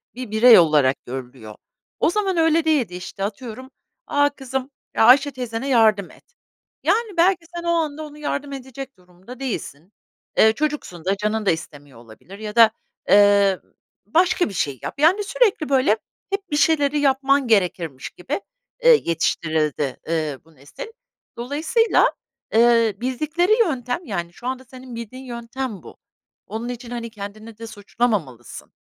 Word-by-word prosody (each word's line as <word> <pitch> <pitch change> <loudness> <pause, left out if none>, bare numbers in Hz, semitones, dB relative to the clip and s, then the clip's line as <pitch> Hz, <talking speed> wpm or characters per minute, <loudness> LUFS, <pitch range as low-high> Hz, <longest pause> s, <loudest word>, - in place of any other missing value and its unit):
bir 250 -3 -7
birey 225 +1 +8
olarak 150 -5 +2
görülüyor. 125 -4 -8 0.4
O - - +3
zaman 385 -1 -1
öyle 325 0 +3
değildi, 270 - +1
işte, 185 +2 -7
atıyorum, 230 +5 -6 0.4
"A 285 0 +3
kızım, 265 -1 -5 0.3
Ayşe 270 +5 +6
teyzene 250 0 -5
yardım 215 -6 +3
et." - - -22 0.5
Yani, 445 -5 0
belki 350 0 +3
sen 345 - -5
o 340 - -1
anda 310 -2 -1
ona 300 -1 -10
yardım 285 -1 -4
edecek 265 -1 -9
durumda 180 +7 -14
değilsin, 195 - -6 0.4
eee, 220 0 +6
çocuksun 280 - -4
da 195 +1 +1
canın 215 +1 -1
da - - +4
istemiyor 145 -5 -7
olabilir 120 - -14
ya 215 0 -6
da, 230 -2 +7 0.4
eee, 200 -1 +5
ı - - -34 0.3
başka 350 - +2
bir - - -9
şey 140 -7 -2
yap, - - -7
yani, 360 +7 +4
sürekli, 415 - +1
böyle, 260 -6 +3 0.3
hep 395 -1 -4
bir 295 - +1
şeyleri 295 -2 +2
yapman 275 -1 +2
gerekirmiş 175 - 0
gibi, 275 - -5 0.4
eee, 485 -2 +7
yetiştirildi, 155 -4 -1
eee, 155 -4 -1
bu 165 -1 -23
nesil. 140 +1 -10 0.5
Dolayısıyla, 315 - +2 0.4
eee, 230 -1 +4
bildikleri 305 - -1
yöntem, 295 - -1
yani, 175 - -4
şu 240 - -9
anda 260 0 -3
senin 255 0 -11
bildiğin 235 +3 -8
yöntem 240 -2 -6
bu - - -13 0.5
onun 225 +3 -5
için, 245 0 -7
hani, 235 -1 -5
kendini 215 +1 -9
de 230 0 -8
suçlamamalısın. 205 - -3
235 Hz, 150 wpm, -22 LUFS, 195-285 Hz, 0.5 s, birey